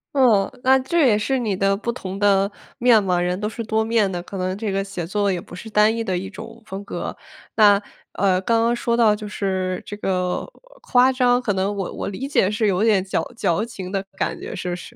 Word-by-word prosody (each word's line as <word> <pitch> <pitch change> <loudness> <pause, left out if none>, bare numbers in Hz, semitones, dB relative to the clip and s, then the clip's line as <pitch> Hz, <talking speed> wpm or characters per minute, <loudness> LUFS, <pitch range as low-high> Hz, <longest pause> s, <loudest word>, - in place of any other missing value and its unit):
嗯， 230 -8 +4
那 265 +1 +5
这 305 +2 +2
也 210 -3 +4
是 265 +5 0
你 215 -5 -1
的 195 +1 +2
不 230 - -5
同 195 -5 -5
的 200 0 +3 0.3
面 240 -3 +5
貌。 180 -3 0
人 180 +1 -1
都 210 - -2
是 230 +1 -5
多 220 0 0
面 220 -3 +1
的， 175 - -3
可 195 - -8
能 185 +1 -2
这 215 0 -3
个 195 0 -1
写 195 -4 -5
作 200 +1 0
也 180 - -1
不 175 - -11
是 220 +5 -9
单 215 +1 +3
一 230 - -2
的 185 -4 -1
一 190 +2 -5
种 225 +3 -10
风 195 0 -7
格。 - - -5 0.4
那， 205 -2 +6 0.3
呃， 190 -2 +2
刚 230 +3 +2
刚 235 +1 +2
说 235 0 0
到 220 -3 +4
就 210 0 -8
是 185 -2 -2
这 205 - -6
个 180 -3 -1 0.4
夸 255 +1 +4
张， 250 -1 +3
可 215 -4 0
能 195 +2 0
我 195 -2 -4
我 - - -4
理 225 +8 -5
解 205 -8 +2
是 215 0 +1
有 195 +1 +1
点 210 -4 +3
矫 190 - -1
矫 185 +1 +1
情 200 -6 -7
的 195 0 -2
感 - - -1
觉， - - -7
是 180 - -4
不 175 - -2
是？ 210 +6 -11
205 Hz, 255 characters per minute, -22 LUFS, 190-230 Hz, 0.4 s, 那